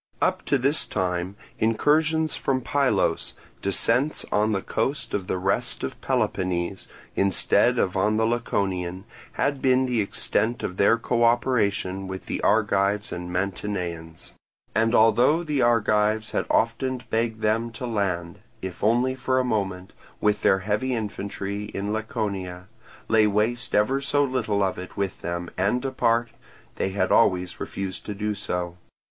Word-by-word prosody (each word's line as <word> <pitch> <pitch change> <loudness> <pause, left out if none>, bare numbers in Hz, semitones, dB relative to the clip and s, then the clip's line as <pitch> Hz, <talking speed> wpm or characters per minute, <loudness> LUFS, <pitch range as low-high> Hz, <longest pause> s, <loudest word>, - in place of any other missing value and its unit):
Up - - +1
to 140 - +2
this 140 +4 +1
time 90 +1 -2 0.2
incursions 155 +7 +2
from 130 -1 0
Pylos, 140 +1 +1 0.3
descents 115 +9 +1
on 105 +1 +2
the 100 -2 -1
coast 140 +3 -2
of 95 -3 -2
the - - -1
rest 95 +2 -1
of - - -5
Peloponnese, 90 +1 -1 0.3
instead 100 +6 +3
of 95 -5 +1
on 105 +3 +2
the 110 - +2
Laconian, 95 -5 -1 0.3
had 140 -2 0
been 130 0 +3
the 125 -3 +1
extent 110 +3 -1
of 90 - -4
their 115 +3 +4
co 120 0 0
operation 105 -6 +1
with 95 0 -6
the - - -3
Argives 105 -1 +2
and 90 0 -5
Mantineans; 90 -3 -4 0.4
and 115 +2 +2
although 120 +9 +4
the 150 -5 0
Argives 110 -2 +2
had - - -1
often 125 +2 0
begged 115 -1 0
them 110 +2 +1
to 125 - -5
land, 95 -5 -2 0.2
if 95 -4 -7
only 120 +4 +3
for 130 0 -1
a 130 - +3
moment, 95 -6 -2 0.3
with 105 0 +1
their 95 0 +3
heavy 110 +5 0
infantry 100 -1 -4
in 100 +2 -2
Laconia, 95 -5 -3 0.4
lay 110 -1 +4
waste 115 +4 0
ever 130 +7 +2
so 145 +1 +2
little 115 -7 0
of 95 -2 -1
it 90 - -9
with 100 -1 -2
them, 85 0 -3
and 100 +6 +2
depart, 120 -3 +1 0.5
they - - 0
had 95 -1 0
always 90 -5 +3
refused 95 -1 -5
to 105 - -4
do 105 +1 -1
so. 90 -3 -3
105 Hz, 150 wpm, -25 LUFS, 95-120 Hz, 0.5 s, their